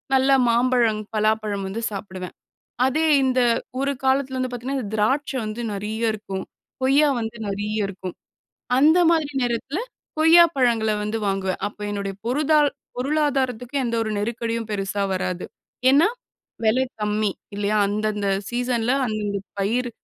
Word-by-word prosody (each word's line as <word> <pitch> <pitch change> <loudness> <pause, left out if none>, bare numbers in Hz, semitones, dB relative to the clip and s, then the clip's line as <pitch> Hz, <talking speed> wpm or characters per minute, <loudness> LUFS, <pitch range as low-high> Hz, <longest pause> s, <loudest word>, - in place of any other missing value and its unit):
நல்ல 265 +1 +4 0.2
மாம்பழம், 235 -2 +2
பலாப்பழம் 215 -2 0
வந்து 205 +4 -4
சாப்பிடுவேன். 190 -3 -7 0.5
அதே 310 +5 +1 0.2
இந்த 255 -1 +2 0.4
ஒரு 275 +1 +1
காலத்தில 265 0 +1
வந்து 255 - -1
பார்த்தீங்கன்னா, 255 +3 -3
இது 210 0 -6
திராட்சை 265 +6 +1
வந்து 215 +2 -4
நெறைய 220 +3 -1
இருக்கும். 195 -3 -5 0.4
கொய்யா 280 +3 +5
வந்து 225 +1 -5
நெறைய 205 +2 -3
இருக்கும். 185 -2 -7 0.7
அந்த 310 +5 +6
மாதிரி 320 -3 +1
நேரத்தில 245 +6 -2 0.4
கொய்யா 325 +2 +8
பழங்கள 235 -4 +2
வந்து 210 +2 -2
வாங்குவேன். 190 -1 -1
அப்ப 205 - -8
என்னுடைய 200 -1 -3
பொருதால் 295 +3 +3 0.3
பொருளாதாரத்துக்கு 265 -2 0
எந்த 235 -1 -1
ஒரு 220 - -3
நெருக்கடியும் 230 +1 -2
பெருசா 200 0 -2
வராது. 185 -1 -2 0.5
ஏன்னா, 295 +8 +5 0.6
வெலை 235 +4 +3 0.2
கம்மி. 210 0 +1 0.2
இல்லையா? 205 +1 0
அந்தந்த 210 0 -1 0.2
சீசன்ல 245 -1 0
அந்தந்த 210 -2 -2 0.2
பயிரு 240 +5 0
230 Hz, 130 wpm, -23 LUFS, 210-260 Hz, 0.7 s, கொய்யா